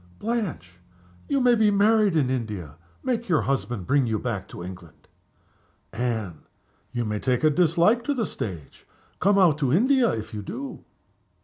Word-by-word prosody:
"Blanche! 185 - -4 0.5
you 280 - +1
may 250 -1 +4
be 220 -2 +4
married 205 -1 +3
in 135 -5 +2
India. 105 - -4 0.3
Make 235 -4 -2
your 160 -4 +3
husband 120 -7 -2
bring 140 +1 +2
you 110 -1 0
back 105 -5 -4
to 85 - -9
England." 90 -2 -11 0.9
"Anne! 110 -8 -3 0.4
you 120 -1 -2
may 105 -1 -2
take 125 +4 0
a 155 - +5
dislike 175 +8 +3
to 285 - 0
the 230 -4 0
stage. 85 - -7 0.3
Come 200 +1 +3
out 170 -6 +4
to 135 -4 +1
India 245 - +4
if 110 0 -5
you 105 - -4
do." 270 - -7
140 Hz, 165 wpm, -25 LUFS, -, 0.9 s, a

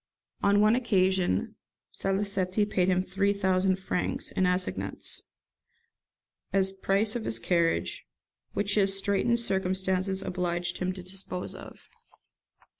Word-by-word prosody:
On 200 +1 +4
one 215 +1 +5
occasion 190 - +1 0.3
Salicetti 195 0 0
paid 185 -3 0
him 185 0 +2
three 195 +2 0
thousand 190 -1 +1
francs, 190 -1 -3
in 185 - +1
assignats, 180 0 -2 1.3
as 190 -1 +3
the 195 - -19
price 205 +4 +2
of 235 - -2
his 115 - +2
carriage, 170 +6 0 0.5
which 205 0 +1
his 195 -1 +4
straitened 200 +4 +2
circumstances 190 -2 0
obliged 175 -1 -2
him 185 0 -1
to 185 -1 -9
dispose 185 0 -5
of. - - -12
190 Hz, 120 wpm, -28 LUFS, 185-200 Hz, 1.3 s, one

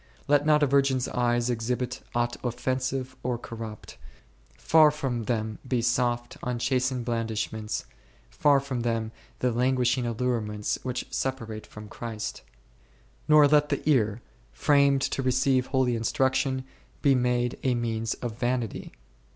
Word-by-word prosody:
Let 145 0 +3
not 150 -1 +5
a - - +6
virgin's 135 -2 +2
eyes 120 0 +1
exhibit 125 +2 -2
aught 120 0 0
offensive 130 +1 -2
or 125 -1 -1
corrupt; 115 -2 -8 0.6
far 155 -1 +6
from 130 -6 -3
them 110 -2 -2
be 125 -1 +1
soft, 120 0 0
unchastened 125 0 -1
blandishments, 110 -2 -2 0.5
far 145 -2 +4
from 135 -2 -4
them 115 -2 -1 0.3
the 125 - +2
languishing 125 0 +1
allurements 110 -3 -1
which 125 -1 -3
se 135 - 0
parate 115 -5 -7
from 105 0 -10
Christ. 110 0 -6 0.9
Nor 150 -1 +7
let 150 0 +4
the 145 0 -2
ear, 115 -6 +2 0.3
framed 140 -2 +3
to - - -1
receive 130 0 +2
holy 130 -3 +1
instruction, 130 +3 0 0.4
be 140 - +5
made 125 -1 0
a 130 -2 +1
means 115 -1 -1
of 120 -3 -5
vanity. 120 -2 -2
125 Hz, 135 wpm, -27 LUFS, 115-130 Hz, 0.9 s, Nor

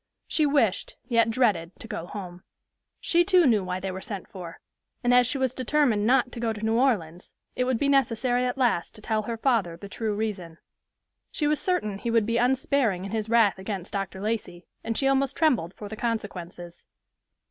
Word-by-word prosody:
She 305 -2 +2
wished, 250 -9 +1
yet 230 -2 +3
dreaded, 205 -8 +1
to - - -10
go 175 - -5
home. 180 -3 -8 0.6
She 345 0 +3
too 365 -2 +4
knew 220 -7 +3
why 180 0 -3
they 190 0 -4
were 190 0 -6
sent 200 -2 -6
for; 180 -3 -9 0.4
and 245 0 +3
as 250 -1 +6
she 275 - 0
was 260 -2 0
determined 255 -5 +1
not 250 0 +3
to 240 - -8
go 230 -1 0
to 215 0 -5
New 220 - +1
Orleans, 180 -11 0 0.2
it 250 - 0
would 255 -2 +1
be 280 - 0
necessary 250 -2 +2
at 250 - -3
last 235 -7 +1
to 215 - -11
tell 220 -1 0
her 230 +2 -4
father 220 -9 +1
the 200 - -9
true 215 +1 -3
reason. 195 -6 -4 0.7
She 300 - -1
was 300 0 +2
certain 215 - -1
he 235 - -3
would 230 -2 +3
be 230 +1 0
unsparing 245 -5 +1
in 195 - -6
his 220 -1 -2
wrath 225 -4 +4
against 190 -1 -5
Dr. 195 -1 -3
Lacey, 210 -5 -3 0.2
and 225 0 -2
she 270 - +1
almost 270 0 +1
trembled 235 - +1
for 210 - -8
the 220 - -7
consequences. 180 -7 -5
225 Hz, 200 wpm, -26 LUFS, 195-255 Hz, 0.7 s, as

